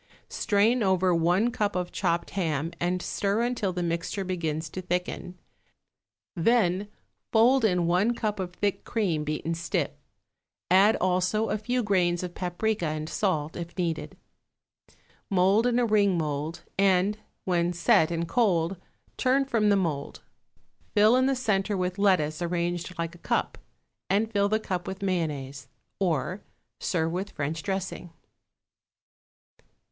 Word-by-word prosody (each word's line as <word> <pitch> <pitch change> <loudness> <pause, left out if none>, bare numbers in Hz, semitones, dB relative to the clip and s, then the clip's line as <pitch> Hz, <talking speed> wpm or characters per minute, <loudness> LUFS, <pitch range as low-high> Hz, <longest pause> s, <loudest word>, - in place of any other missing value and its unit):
Strain 225 +3 +2
over 190 -2 +3
one 175 +8 +2
cup 210 -3 -1
of 180 -1 -2
chopped 170 -3 -1
ham 165 -4 -1
and 180 +1 -1
stir 205 +3 0
until 240 -5 -1
the 180 -1 -3
mixture 170 +4 -2
begins 165 -4 -2
to 185 - -5
thicken, 180 0 -3 1.0
then 195 0 +2 0.4
fold 240 +4 +5
in 180 -5 +2
one 185 +8 +2
cup 210 -3 -2
of 180 -2 -3
thick 200 +2 -2
cream 185 -10 -1
beaten 155 +2 -2
stiff; 165 0 -1 0.8
add, 200 +4 +6
also, 185 +4 +1
a 215 - +1
few 245 +3 -1
grains 180 -4 +1
of 180 -1 -5
paprica 180 +1 -1
and 155 +1 -3
salt, 160 -7 -1
if 170 +1 -7
needed. 170 -3 -2 1.1
Mould 195 +4 +3
in 245 -1 +2
a 245 - +3
ring 205 -4 +3
mould, 155 +1 -3 0.2
and, 195 +2 +3 0.3
when 175 -1 +1
set 170 -2 +3
and 170 0 -2
cold, 185 -4 +1 0.4
turn 270 +1 +2
from 225 -5 +2
the 200 - +5
mould; 160 -7 -2 0.7
fill 215 +3 +6
in 260 +1 +3
the 270 - +2
centre 210 -4 0
with 180 +1 -2
lettuce 180 -6 +2
arranged 175 +1 -2
like 170 0 -3
a 175 - -14
cup, - - -1 0.5
and 215 +3 +1
fill 200 0 +2
the 215 +1 +2
cup 180 -5 -4
with 190 +1 -5
mayonnaise. 145 -8 -2 0.3
Or, 180 +1 -1 0.4
serve 165 -2 0
with 190 +4 -3
French 155 0 -3
dressing. 190 -2 -4
185 Hz, 140 wpm, -27 LUFS, 170-205 Hz, 1.1 s, add